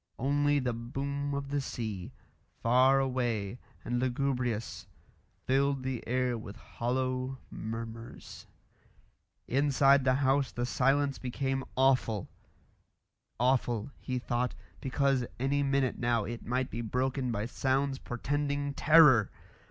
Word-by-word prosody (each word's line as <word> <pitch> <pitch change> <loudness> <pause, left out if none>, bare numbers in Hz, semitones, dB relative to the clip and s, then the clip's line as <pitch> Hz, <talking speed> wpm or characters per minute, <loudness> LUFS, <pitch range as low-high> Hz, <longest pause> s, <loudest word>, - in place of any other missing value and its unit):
Only 145 +2 +2
the 125 -3 0
boom 140 +4 -3
of 140 0 -4
the 145 0 0
sea, 110 -8 -5 0.5
far 130 +3 +5
away 120 -5 -1 0.3
and 120 0 -1
lugubrious, 125 -3 -1 0.6
filled 135 0 +1
the 130 -3 -3
air 125 -1 0
with 105 -2 -9
hollow 130 +3 -2
murmurs. 115 +1 -7 1.0
Inside 140 0 +4
the 130 0 +3
house 135 0 +2
the 120 - -2
silence 135 +2 +1
became 135 +1 -2
awful; 130 -6 +2 1.1
awful, 125 -2 +1
he 130 - -3
thought, 125 0 -1 0.2
because 135 -1 +1 0.2
any 140 +2 +1
minute 135 -2 +1
now 120 -2 +1
it 120 0 -6
might 125 +2 -1
be 115 - -3
broken 130 +2 -1
by 105 -1 -2
sounds 135 +2 0
portending 145 +3 -2
terror. 145 -9 +6
130 Hz, 115 wpm, -30 LUFS, 120-140 Hz, 1.1 s, terror